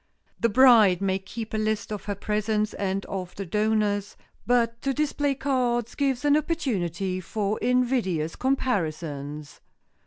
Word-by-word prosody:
The 230 - +2
bride 225 -6 +6
may 195 -1 0
keep 220 +4 -7
a 215 - 0
list 215 -1 -1
of 210 - -5
her 205 0 -2
presents 210 +1 -1
and 195 0 -2
of 185 -2 -6
the 195 - -5
donors, 210 +1 0 0.3
but 235 -1 +2
to 275 -1 -1
display 290 -1 0
cards 245 -4 0
gives 270 -2 -1
an 290 0 +5
opportunity 195 - -1
for 205 +3 -2
invidious 240 -11 0
comparisons. 155 - -2
215 Hz, 135 wpm, -26 LUFS, 190-250 Hz, 0.3 s, bride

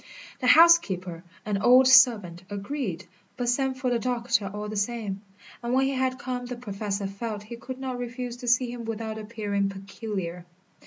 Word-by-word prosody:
The 250 - -1
housekeeper, 240 - +5 0.2
an 205 -2 -1
old 255 +3 +6
servant, 230 -10 +5
agreed, 200 - -4 0.3
but 245 -1 -1
sent 265 +1 0
for 255 -1 -1
the 240 - +1
doctor 235 -4 0
all 210 +1 -5
the 215 - -5
same; 205 -2 -2 0.4
and 240 +1 -1
when 265 +1 +3
he 270 - 0
had 260 -1 0
come 250 -2 -4
the 250 - -5
Professor 205 -3 -4
felt 205 +2 -5
he 230 +3 -8
could 255 +2 -8
not 260 -2 -4
refuse 245 0 -5
to 245 - -8
see 245 0 +3
him 240 -1 -7
without 220 -1 -4
appearing 210 -2 -2
peculiar. 195 -3 -6
235 Hz, 175 wpm, -26 LUFS, 200-250 Hz, 0.4 s, old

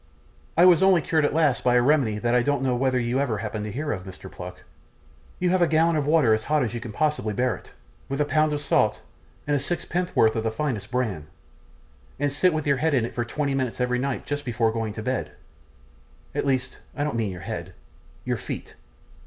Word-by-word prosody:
I 175 - +7
was 180 -1 +6
only 190 -2 +5
cured 155 -1 +1
at - - 0
last 150 -6 +2
by 125 -1 +3
a 120 - +5
remedy 130 -6 +3
that 120 +2 0
I 125 - +4
don't 145 +1 0
know 130 -2 +1
whether 130 0 +1
you 120 +2 0
ever 125 -6 0
happened 105 0 -4
to 105 - -4
hear 145 +6 -3
of, 90 - -3
Mr. 95 -1 -10
Pluck. - - -9 0.7
You 180 0 +1
have 185 -1 +2
a 175 - +5
gallon 165 +1 +3
of 145 -2 0
water 150 -8 +4
as 110 0 -1
hot 150 -2 +2
as 120 - -2
you 120 - -3
can 115 - -7
possibly 150 -5 0
bear 125 0 +1
it, - - -14 0.4
with 135 +1 -2
a 150 - +3
pound 155 +1 +2
of 145 -1 -2
salt, 145 - +2 0.4
and 145 - +1
sixpen'orth 175 -6 +1
of 110 - -1
the 110 - +1
finest 110 -4 -3
bran, 110 -12 -2 0.9
and 145 0 +1
sit 180 +6 +3
with 155 -1 -2
your 140 -2 +2
head 155 +2 +1
in 120 -4 +2
it - - -7
for 120 - -1
twenty 140 +3 -2
minutes 130 -3 -2
every 125 0 +1
night 135 0 -2
just 145 0 -3
before 115 -3 +1
going 115 -1 -2
to 110 - -6
bed; 85 - -2 1.0
at - - -1
least, 130 -1 -1 0.2
I 145 - 0
don't 150 -4 -2
mean 110 -3 0
your 90 -1 -8
head 95 -4 -6 0.5
your 125 -1 0
feet. - - -7
130 Hz, 225 wpm, -25 LUFS, 115-150 Hz, 1.0 s, I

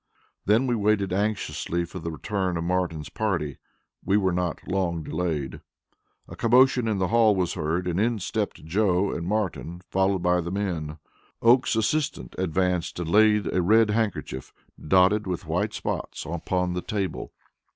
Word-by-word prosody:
Then 110 +6 +3
we 125 - +1
waited 105 -3 +1
anxiously 100 -4 -1
for 90 +2 -8
the 85 0 -4
return 95 +2 -2
of 85 - -2
Martin's 85 -4 -1
party. 85 -10 -2 0.4
We 100 +3 +2
were 95 -3 +2
not 90 -2 -2
long 90 -4 -1
delayed. 75 -7 -3 0.7
A - - -9
commotion 125 0 +4
in 110 -2 0
the 95 -2 0
hall 115 -2 +4
was 90 -3 0
heard, 85 +1 -1
and 90 0 -1
in 115 +2 +1
stepped 90 - -3
Joe 95 +2 +1
and 85 - -4
Martin, 95 -4 -2
followed 95 -1 +1
by 90 0 +3
the 85 - -5
men. 85 -6 -3 0.5
Oakes's 125 +1 +4
assistant 150 +4 -2
advanced 90 0 0
and 85 -1 -3
laid 105 -2 +4
a 90 - +2
red 110 +4 +4
handkerchief, 105 - -2 0.3
dotted 95 +5 +3
with 90 -3 -3
white 90 +7 -1
spots, - - -4
upon 90 +3 -1
the 90 - -2
table. 100 -2 -3
95 Hz, 160 wpm, -25 LUFS, 85-105 Hz, 0.7 s, commotion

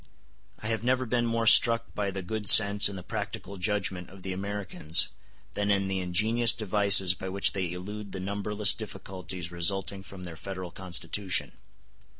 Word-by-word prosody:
I - - -13
have 110 -1 -2
never 130 +1 0
been 120 0 -1
more 115 0 -2
struck 115 +1 +5
by 100 -1 -3
the 95 -1 -6
good 105 +2 -1
sense 105 -1 +9
and 100 - -8
the 90 - -9
practical 100 +3 -7
judgment 95 -2 -3
of 95 0 -15
the 95 - -5
Americans 100 -4 -2 0.4
than 105 0 -2
in 100 -1 +1
the 95 0 -3
ingenious 110 +6 +1
devices 100 -4 +3
by 95 0 -8
which 100 0 -1
they 95 -3 -3
elude 100 +3 -8
the 95 - -7
numberless 100 +2 -1
difficulties 95 -4 -8
resulting 95 +2 -2
from 95 -1 -12
their 85 -2 -9
Federal 95 0 -8
Constitution. 95 +1 -2
100 Hz, 165 wpm, -27 LUFS, 95-105 Hz, 0.4 s, sense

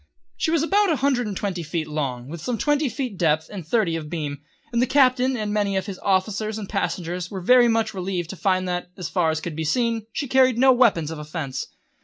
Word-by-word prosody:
She - - -1
was 325 -2 +2
about 400 +2 +3
a - - +3
hundred 260 -4 +1
and 200 -3 -4
twenty 190 -4 -2
feet 160 0 -3
long, 135 -5 -3
with 160 +2 -7
some 240 +6 -2
twenty 295 +2 +1
feet 260 -1 -3
of 195 - -12
depth 160 -2 +1
and 190 -4 -5
thirty 170 0 +1
of 155 -2 -5
beam, 145 -4 -4 0.3
and 235 - +2
the 255 - +2
Captain 255 -1 +3
and 210 -2 -2
many 205 -2 0
of 190 - -1
his 195 -3 -7
officers 210 +2 0
and 210 -3 -6
passengers 180 -3 -3
were 195 - -5
very 245 +6 +5
much 225 -1 +1
relieved 180 -3 -3
to - - -7
find 185 -1 0
that, 180 0 -3
as 180 -4 -4
far 175 -4 +1
as 160 0 -1
could 165 -2 -5
be 160 - -2
seen, 230 +5 0
she 280 - -3
carried 260 -2 +4
no 260 +2 +6
weapons 205 - +3
of 160 - -6
offence. 150 -4 -5
195 Hz, 240 wpm, -23 LUFS, 165-245 Hz, 0.3 s, no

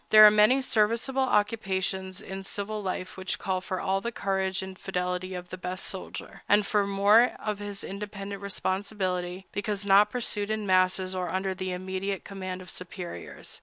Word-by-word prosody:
There 215 0 +10
are 210 - +10
many 215 +6 +5
serviceable 235 +3 +1
occupations 195 -4 0
in 195 0 -6
civil 210 +2 -3
life 185 -1 -4
which 190 0 -1
call 185 -1 -1
for 185 0 -3
all 195 0 0
the 235 - -2
courage 190 -3 -1
and 190 0 -7
fidelity 180 0 -2
of 180 0 -7
the 185 - -6
best 185 +1 -3
soldier, 190 - -6
and 205 0 +5
for 205 -1 +2
more 205 +4 +5
than 210 -1 -1
his 205 -1 -5
independent 200 0 -6
responsibility, 190 -2 -2
because 205 -1 -2
not 200 +1 +6
pursued 210 -3 -2
in 215 -1 -1
masses 185 0 +3
or 180 -2 -2
under 190 +2 -1
the 185 0 -4
immediate 190 +1 -3
command 185 -2 -5
of 180 - -11
superiors. 175 - -7
195 Hz, 170 wpm, -28 LUFS, 185-210 Hz, -, There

